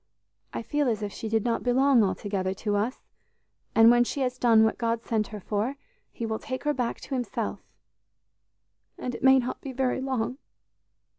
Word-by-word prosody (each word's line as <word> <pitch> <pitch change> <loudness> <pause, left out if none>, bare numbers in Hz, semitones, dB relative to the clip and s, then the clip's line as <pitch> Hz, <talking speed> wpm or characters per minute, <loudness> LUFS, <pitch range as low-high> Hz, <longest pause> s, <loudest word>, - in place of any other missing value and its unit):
I - - -4
feel 290 +3 0
as 215 -2 -1
if 205 - -4
she 220 - -5
did 225 0 +1
not 235 -1 0
belong 255 -1 +4
altogether 190 -1 -1
to 205 +1 -2
us, 220 +6 -2 0.7
and 225 +1 +8
when 240 0 +5
she 275 +3 -3
has 255 -1 -1
done 225 -2 +5
what 220 - +1
God 230 -1 -1
sent 215 -2 0
her 210 - -7
for, 210 +7 -2 0.4
He 230 - -5
will 220 -1 -2
take 260 -1 -5
her 295 -1 +1
back 245 -4 -2
to 275 - -7
Himself 250 -2 -2 1.4
and 250 - -4
it - - -7
may 265 0 +7
not 255 -1 -2
be 275 - -6
very 260 0 0
long!" 260 -1 -2
235 Hz, 190 wpm, -27 LUFS, 220-260 Hz, 1.4 s, and